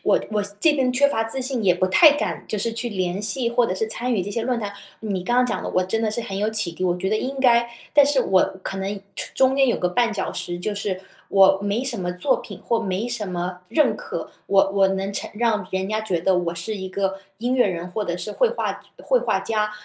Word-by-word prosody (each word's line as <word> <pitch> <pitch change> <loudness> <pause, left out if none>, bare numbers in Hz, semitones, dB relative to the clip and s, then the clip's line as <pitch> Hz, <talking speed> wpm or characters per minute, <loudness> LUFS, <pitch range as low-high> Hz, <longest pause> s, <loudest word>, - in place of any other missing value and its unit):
我 - - +4
我 210 -1 +1 0.2
这 320 -2 +5
边 255 -3 +1
缺 280 +3 +4
乏 225 -5 0
自 245 +4 -1
信， 255 -3 -2
也 180 -2 +5
不 185 +1 +1
太 290 - +7
敢 295 - -3
就 215 - -2
是 230 +3 -1
去 235 +1 -2
联 185 -3 -2
系 235 +4 -1
或 235 0 +3
者 185 - -2
是 220 +3 -1
参 245 +3 -1
与 190 - 0
这 205 - -5
些 230 +1 -2
论 245 0 0
坛， 205 -1 -4 0.3
你 195 -4 -3
刚 240 +4 +1
刚 250 - +5
讲 245 - -2
的 - - -4
我 185 - +2
真 190 +5 -1
的 220 -1 0
是 225 - -2
很 195 -4 -5
有 210 +2 0
启 215 -5 -1
迪， 185 - -4
我 175 0 +1
觉 190 +2 -2
得 215 - +2
应 270 +4 -3
该 235 -2 +4 0.3
但 290 -1 +8
是 280 -2 +2
我 190 -6 +4 0.2
可 195 - -4
能 195 +1 -3 0.2
出 - - -4
中 265 0 +3
间 270 - +5
有 - - +2
个 180 0 -1
绊 235 +2 +2
脚 205 - -3
石， 175 0 -4
就 205 +3 -3
是 195 -2 -3 0.3
我 195 0 +5
没 205 +5 0
什 240 -5 -3
么 180 -1 -2
作 180 +10 +2
品 - - -10
或 235 - +2
没 195 +4 -2
什 225 -4 -3
么 180 0 -4
认 300 +7 +2
可。 475 -2 -6 0.2
我 195 0 +4
我 195 -1 +4
能 195 +1 -2
成 - - -3
让 215 -4 0
人 190 0 -2
家 215 +1 -1
觉 185 -6 -1
得 185 +1 +2
我 175 -1 -1
是 180 +6 -4
一 190 -1 -5
个 195 0 -2 0.2
音 245 +3 0
乐 250 -3 +4
人 175 -2 -3
或 210 +3 -2
者 175 -2 -2
是 180 +4 -4
绘 - - +3
画 485 - -3 0.2
绘 - - +3
画 - - 0
家。 215 -1 -1
210 Hz, 285 characters per minute, -23 LUFS, 190-240 Hz, 0.3 s, 但